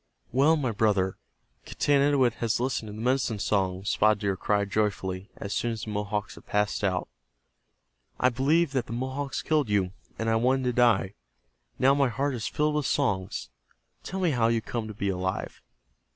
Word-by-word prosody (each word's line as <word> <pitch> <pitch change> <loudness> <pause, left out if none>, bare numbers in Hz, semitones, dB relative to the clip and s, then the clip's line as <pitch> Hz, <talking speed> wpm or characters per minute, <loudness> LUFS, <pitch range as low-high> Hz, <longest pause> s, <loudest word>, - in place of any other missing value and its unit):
"Well, 140 +6 +4
my 135 -6 -1
brother, 100 -3 +1 0.4
Getanittowit 140 -4 +2
has 115 -1 +1
listened 125 -3 -1
to 105 - -7
the 105 - -8
medicine 125 -2 +1
songs!" 95 0 0
Spotted 110 0 +3
Deer 100 -2 0
cried, 100 +1 0
joyfully, 95 -2 -1
as 100 - -4
soon 120 -1 0
as 110 0 -6
the 110 - -5
Mohawks 105 0 -2
had - - -15
passed 105 0 0
out. 90 -2 0 1.1
"I 125 - +4
believed 140 +5 +2
the 125 -4 -1
Mohawks 130 +3 -3
killed 150 -7 +1
you, 100 -3 +1 0.3
and 115 - -2
I 115 0 +3
wanted 130 +3 +2
to 125 -1 0
die. 115 -6 +3 0.6
Now 135 +1 +5
my 140 -2 +2
heart 135 +4 -1
is 115 -3 -3
filled 150 0 0
with 150 -2 0
songs. 95 - -1 0.5
Tell 190 - -4
me 180 -4 +2
how 120 -4 +2
you 115 0 +2
come 115 0 -4
to 110 - -8
be 100 -1 -1
alive." 95 0 -3
115 Hz, 180 wpm, -27 LUFS, 100-135 Hz, 1.1 s, Now